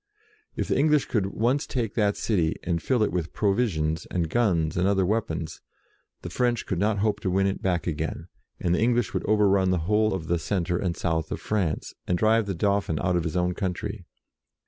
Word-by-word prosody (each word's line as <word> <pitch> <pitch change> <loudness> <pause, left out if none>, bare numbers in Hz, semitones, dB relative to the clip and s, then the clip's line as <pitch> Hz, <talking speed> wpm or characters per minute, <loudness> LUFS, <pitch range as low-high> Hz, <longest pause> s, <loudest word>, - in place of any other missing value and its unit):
If - - -2
the - - +1
English 150 0 +3
could 105 -5 0
once 120 +8 0
take 115 -6 -2
that 105 -3 +1
city, 85 -7 +1
and 85 -1 -1
fill 125 -4 +1
it - - 0
with 85 -2 -3
pro 100 -2 +2
visions, 80 -9 -1
and 85 -3 -2
guns, 85 -10 +1
and 90 +2 +2
other 95 -2 +2
weapons, 80 -7 -2 0.6
the - - -6
French 120 -2 0
could 95 - -2
not 105 +2 +1
hope 105 0 0
to 95 - -2
win 95 +2 +2
it 95 - -1
back 90 -3 0
again, 80 0 -3 0.3
and 85 - +1
the 90 - +1
English 120 -3 +1
would - - -1
overrun 100 -3 +3
the 90 - +2
whole 105 +1 +2
of 90 -4 -5
the 85 +1 0
centre 90 -1 -1
and 90 -2 -2
south 80 -2 -1
of - - -3
France, 95 -7 -2
and 90 - +1
drive 110 +2 +3
the 95 - -2
Dauphin 100 -3 0
out 90 0 +1
of 85 - +1
his 80 +2 -2
own 90 0 +1
country. 90 -2 -4
95 Hz, 215 wpm, -26 LUFS, 85-110 Hz, 0.6 s, English